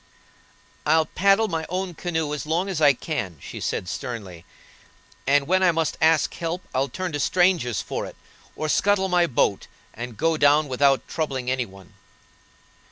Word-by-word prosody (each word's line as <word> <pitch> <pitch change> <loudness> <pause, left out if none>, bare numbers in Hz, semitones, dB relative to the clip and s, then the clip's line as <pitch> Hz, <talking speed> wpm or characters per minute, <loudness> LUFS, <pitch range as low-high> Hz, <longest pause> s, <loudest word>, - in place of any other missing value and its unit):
"I'll 160 +1 +3
paddle 195 +6 +3
my 165 -4 -2
own 185 0 -3
canoe 160 -3 -2
as 150 0 -5
long 175 +5 0
as 175 -5 -2
I 145 -2 +7
can," 120 - -4
she - - -8
said, 90 - -2
sternly; 95 -7 -6 0.8
"and 140 0 +4
when 185 +5 +2
I 185 -2 +5
must 165 -1 -1
ask 160 -1 +3
help 170 +2 -4
I'll 135 +1 0
turn 185 -1 -4
to 145 - -3
strangers 175 - +2
for - - -4
it, - - -11 0.4
or 155 - -3
scuttle 190 +4 +2
my 175 -1 +3
boat, 110 -7 0 0.3
and 120 -1 -7
go 165 0 +1
down 145 +1 +4
without 135 +1 +2
troubling 135 -5 -2
any 130 -2 -1
one." 95 -2 -16
155 Hz, 165 wpm, -24 LUFS, 130-175 Hz, 0.8 s, I